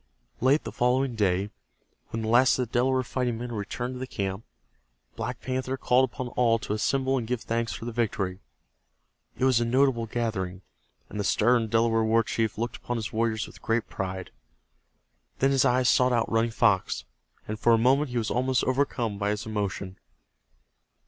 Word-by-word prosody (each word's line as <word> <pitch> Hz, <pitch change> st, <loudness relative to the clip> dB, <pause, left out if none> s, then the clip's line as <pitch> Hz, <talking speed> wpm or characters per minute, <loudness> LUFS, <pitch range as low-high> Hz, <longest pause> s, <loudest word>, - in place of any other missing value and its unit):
Late 135 Hz, +5 st, +3 dB
the -, -, -6 dB
following 125 Hz, +1 st, +1 dB
day 100 Hz, -2 st, 0 dB, 0.6 s
when 115 Hz, 0 st, -4 dB
the -, -, -2 dB
last 120 Hz, +3 st, +5 dB
of 125 Hz, -2 st, -1 dB
the -, -, -31 dB
Delaware 130 Hz, +1 st, +2 dB
fighting 125 Hz, -2 st, -2 dB
men 120 Hz, +1 st, -5 dB
had 120 Hz, -, -5 dB
returned 120 Hz, +5 st, -4 dB
to 125 Hz, -, -7 dB
the 130 Hz, -, -4 dB
camp, 95 Hz, -2 st, -3 dB, 0.7 s
Black -, -, -4 dB
Panther 130 Hz, +1 st, -2 dB
called 130 Hz, 0 st, +3 dB
upon 125 Hz, 0 st, -5 dB
all 120 Hz, -2 st, +2 dB
to 110 Hz, -2 st, -4 dB
assemble 135 Hz, +4 st, +1 dB
and 115 Hz, -, -5 dB
give 125 Hz, -1 st, -2 dB
thanks 115 Hz, 0 st, -1 dB
for -, -, -7 dB
the 120 Hz, -, -3 dB
victory. 100 Hz, -5 st, -1 dB, 1.0 s
It 130 Hz, -, +1 dB
was 130 Hz, -3 st, +4 dB
a -, -, +1 dB
notable 120 Hz, -1 st, +2 dB
gathering, 100 Hz, -6 st, -3 dB, 0.4 s
and 105 Hz, -, -7 dB
the -, -, 0 dB
stern 115 Hz, +3 st, +3 dB
Delaware 115 Hz, 0 st, +2 dB
war 115 Hz, +1 st, +3 dB
chief 110 Hz, -1 st, -1 dB
looked 120 Hz, +2 st, -3 dB
upon 120 Hz, -, -4 dB
his 115 Hz, -1 st, -5 dB
warriors 110 Hz, -1 st, 0 dB
with -, -, -14 dB
great 115 Hz, 0 st, -1 dB
pride. 95 Hz, -1 st, -5 dB, 1.1 s
Then 135 Hz, +1 st, +2 dB
his 135 Hz, 0 st, +3 dB
eyes 125 Hz, -1 st, +3 dB
sought 125 Hz, 0 st, +4 dB
out 115 Hz, -1 st, 0 dB
Running 115 Hz, +1 st, +2 dB
Fox, 110 Hz, -4 st, +1 dB, 0.4 s
and 110 Hz, 0 st, -4 dB
for 120 Hz, -, +3 dB
a -, -, +5 dB
moment 135 Hz, +5 st, +3 dB
he 125 Hz, -, -3 dB
was 110 Hz, -2 st, -1 dB
almost 130 Hz, +1 st, +1 dB
overcome 125 Hz, -5 st, 0 dB
by 100 Hz, 0 st, 0 dB
his 105 Hz, +2 st, -2 dB
emotion. 100 Hz, -3 st, -4 dB
115 Hz, 190 wpm, -27 LUFS, 110-125 Hz, 1.1 s, last